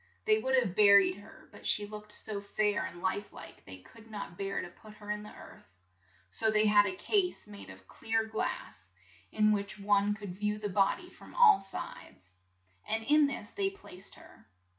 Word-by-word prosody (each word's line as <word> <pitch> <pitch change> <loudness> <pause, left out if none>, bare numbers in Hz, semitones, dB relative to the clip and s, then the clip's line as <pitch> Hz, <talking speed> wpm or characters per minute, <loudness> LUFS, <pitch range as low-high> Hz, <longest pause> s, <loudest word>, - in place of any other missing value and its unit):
They 435 0 +4
would 265 -9 +1
have 235 -9 +1
bur 200 -1 +8
ied 185 -1 0
her, 205 - -16
but - - -14
she 205 - +2
looked 210 0 -10
so 210 -1 -2
fair 205 +1 0
and 175 +1 -9
life 200 +2 -2
like - - -12
they 95 -1 -9
could 225 - -17
not 205 -5 -7
bear 195 +1 -3
to - - -5
put 215 +4 -16
her 210 -1 -7
in 210 0 -3
the 210 - -10
earth. - - -15 0.6
So 220 - +1
they 215 0 +3
had 205 -1 +5
a 190 - -2
case 365 - 0
made 100 -2 -11
of 95 0 -13
clear 225 0 -1
glass, 220 0 -5 0.4
in 215 0 +3
which 200 0 -1
one 205 0 +2
could 205 -3 -7
view 210 0 0
the 210 -1 -4
bod 195 - +2
y 355 - -12
from - - -15
all 475 - +7
sides, 145 - -7 0.6
and 225 0 -1
in 295 +4 +4
this 220 -6 -5
they 390 -1 0
placed 195 - -7
her. - - -17
210 Hz, 205 wpm, -31 LUFS, 195-220 Hz, 0.6 s, bur